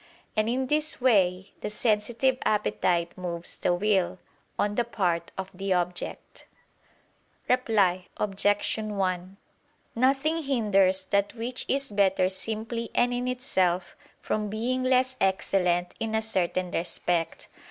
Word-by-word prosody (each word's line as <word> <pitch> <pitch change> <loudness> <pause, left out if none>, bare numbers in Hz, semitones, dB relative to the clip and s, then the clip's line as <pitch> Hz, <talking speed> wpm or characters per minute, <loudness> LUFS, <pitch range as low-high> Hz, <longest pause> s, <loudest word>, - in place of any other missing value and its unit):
And 215 +1 +1
in 260 +2 0
this 300 +3 0
way, 195 -6 +2
the - - -3
sensitive 235 +4 +1
appetite 175 -5 +1
moves 175 -2 -5
the - - +1
will, 190 0 +1 0.4
on 205 0 +1
the 240 - +1
part 180 -7 -1
of 190 0 -5
the 195 +1 -1
object. 180 0 -4 1.0
Reply 205 -8 +2
Obj. 205 +1 +1
1: 190 -3 -2 0.6
Nothing 275 +6 +2
hinders 200 -9 +2
that 200 +3 0
which 240 +2 -3
is 275 -3 0
better 190 -2 +3
simply 220 +4 -3
and 245 0 +3
in 245 +1 -2
itself, 190 -8 0 0.2
from 210 -1 -2
being 240 +5 -1
less 255 0 +2
excellent 180 -2 +1
in 220 -1 -2
a 220 - +1
certain 185 -4 0
respect. 170 0 -1
205 Hz, 125 wpm, -27 LUFS, 185-240 Hz, 1.0 s, better